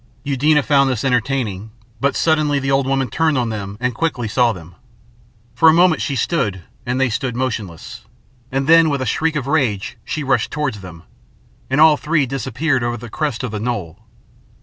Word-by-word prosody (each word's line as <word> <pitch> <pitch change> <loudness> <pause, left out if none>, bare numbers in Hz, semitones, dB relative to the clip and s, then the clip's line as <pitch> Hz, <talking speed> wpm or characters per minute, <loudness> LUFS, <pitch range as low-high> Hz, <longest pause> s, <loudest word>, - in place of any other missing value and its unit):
Eudena 145 +2 +2
found 140 -1 +3
this 125 -4 -2
entertaining, 120 -5 -1 0.3
but 140 +3 0
suddenly 155 -3 +2
the 135 0 -1
old 135 -1 +2
woman 135 -1 0
turned 155 +4 +1
on 120 -2 0
them 100 -2 -5 0.2
quickly 160 -6 -2
and 105 - -5
saw 120 -1 +3
them. 90 -4 -10 0.8
For 160 +6 +5
a - - +5
moment 175 -1 +4
she 140 - -2
stood 115 - -1 0.2
and 125 +1 -1
they 135 - +3
stood 125 +1 -2
motionless, 110 -5 -4 0.5
and 135 +1 -1
then 165 +1 +6
with 140 -3 -1
a - - -4
shriek 160 +7 0
of 140 -5 -2
rage, 130 -9 -1
she 155 - -4
rushed 130 -4 +1
towards 145 -9 -3
them, 85 -3 -11 0.7
and 135 +2 +1
all 155 -1 +7
three 155 -2 +1
disappeared 130 +1 -1
over 120 0 -2
the 120 0 -10
crest 150 -6 -2
of 125 - -3
the 105 - -4
knoll. 105 -8 -4
130 Hz, 190 wpm, -19 LUFS, 115-150 Hz, 0.8 s, all